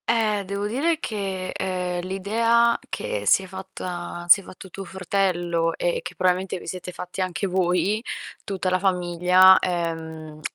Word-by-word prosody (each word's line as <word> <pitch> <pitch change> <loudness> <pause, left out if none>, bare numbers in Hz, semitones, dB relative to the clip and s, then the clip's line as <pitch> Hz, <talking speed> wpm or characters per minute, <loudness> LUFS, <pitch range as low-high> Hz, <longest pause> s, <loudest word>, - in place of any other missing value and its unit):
Eh, 215 -3 +2
devo 200 +2 -3
dire 305 +9 0
che, 195 - -3
ehm, 180 -1 -2
l'idea 230 +5 +2
che - - -3
si 195 - +5
è - - -8
fatta 180 -2 -6
si 195 +3 +8
è - - -17
fatto 185 +1 -12
tuo 195 +2 -7
fratello 175 -3 0
e 175 - 0
che - - -8
probabilmente 185 +1 +1
vi - - -11
siete 180 0 -5
fatti 180 +1 -6
anche 185 +2 -1
voi, 185 +4 +1 0.4
tutta 190 -2 -2
la 185 0 +1
famiglia, 180 0 +5
ehm, 160 -3 -4
185 Hz, 155 wpm, -24 LUFS, 175-200 Hz, 0.4 s, si